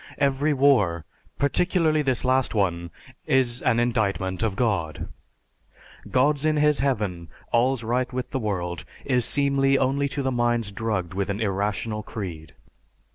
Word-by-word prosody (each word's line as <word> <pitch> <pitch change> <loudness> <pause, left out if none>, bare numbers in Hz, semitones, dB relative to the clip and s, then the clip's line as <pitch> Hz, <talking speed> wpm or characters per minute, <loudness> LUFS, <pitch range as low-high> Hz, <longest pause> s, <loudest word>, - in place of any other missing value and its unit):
Every 140 +1 +1
war, 125 - +3 0.3
particularly 155 +1 +2
this 130 -3 0
last 130 -1 +1
one, 85 -4 0 0.4
is 125 -2 +2
an 120 -2 +2
indictment 100 -6 0
of 110 -4 0
God. 95 - -1 1.0
"God's 140 +3 +2
in 155 0 +2
His 150 0 +3
Heaven, 105 - -1 0.2
all's 125 +1 +2
right 120 +2 -1
with 125 0 -4
the 135 - -1
world," 90 -6 -3 0.2
is 125 -4 +2
seemly 135 0 +2
only 140 +2 +1
to 135 -1 -2
minds 120 -3 0
drugged 100 -5 -2
with 100 +1 -2
an 100 +1 -2
irrational 105 +1 -1
creed. 85 -10 -7
120 Hz, 135 wpm, -24 LUFS, 100-135 Hz, 1.0 s, war